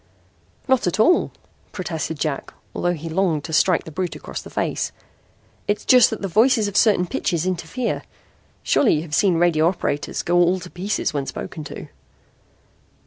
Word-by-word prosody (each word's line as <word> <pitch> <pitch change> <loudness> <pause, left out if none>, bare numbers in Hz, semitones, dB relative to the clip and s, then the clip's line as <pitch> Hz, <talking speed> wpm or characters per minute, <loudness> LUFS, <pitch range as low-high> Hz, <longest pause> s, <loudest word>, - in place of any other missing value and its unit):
"Not 260 -6 +2
at 180 - -1
all," 350 +11 +4 0.4
protested 165 -3 -4
Jack, 150 -3 -3 0.2
although 175 0 0
he 165 +1 -7
longed 165 -3 0
to 160 - -7
strike 180 +2 +3
the 160 - -10
brute 180 +3 -3
across - - -7
the - - -11
face. - - -2 0.8
"It's 205 +1 -1
just 250 -1 +7
that 225 - -5
voices 220 +3 +3
of 205 - -6
certain 205 -5 +4
pitches 170 -1 -1
interfere. 185 +7 -2 0.6
Surely 240 - +3
you 150 - -1
have 155 -3 -10
seen 185 +1 +3
radio 165 -2 +3
operators 170 -5 -2
go 175 +1 +1
all 175 +2 +3
to 180 - -10
pieces 190 +1 -2
when 140 -2 -2
spoken 155 - -6
to." - - -8
175 Hz, 165 wpm, -22 LUFS, 160-205 Hz, 0.8 s, just